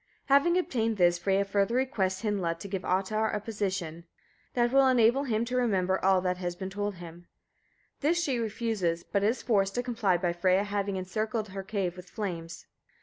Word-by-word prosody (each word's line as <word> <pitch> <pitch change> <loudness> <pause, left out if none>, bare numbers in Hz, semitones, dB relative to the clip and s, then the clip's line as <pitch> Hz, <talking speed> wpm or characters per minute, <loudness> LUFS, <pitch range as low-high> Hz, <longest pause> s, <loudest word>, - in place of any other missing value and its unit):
Having 280 +6 +5
obtained 230 - 0
this, 175 -1 +3
Freyia 195 +2 +1
further 200 +3 +1
requests 215 -7 0
Hyndla 190 -6 -1
to 200 - -8
give 195 -1 -3
Ottar 210 +4 0
a - - -1
potion 190 -6 -3
(minnisol) - - -34 0.5
that 240 -1 +2
will 270 0 +5
enable 250 +2 +4
him 230 -2 0
to 250 +1 -4
remember 190 -7 +1
all 190 -1 +4
that 180 0 -1
has 175 -1 -3
been 190 +1 -6
told 205 0 -3
him. 175 0 -11 0.7
This 325 +5 +2
she 265 -7 0
refuses, 215 -7 -1
but 200 - -1
is 225 +5 +1
forced 195 -4 +1
to 245 - 0
comply 225 -7 +1
by 175 -1 -1
Freyia 185 +3 +2
having 200 -1 -2
encircled 215 +3 -2
her 195 +1 -5
cave 190 -3 -2
with 180 0 -11
flames. 170 -6 -5
200 Hz, 190 wpm, -29 LUFS, 185-230 Hz, 0.7 s, Having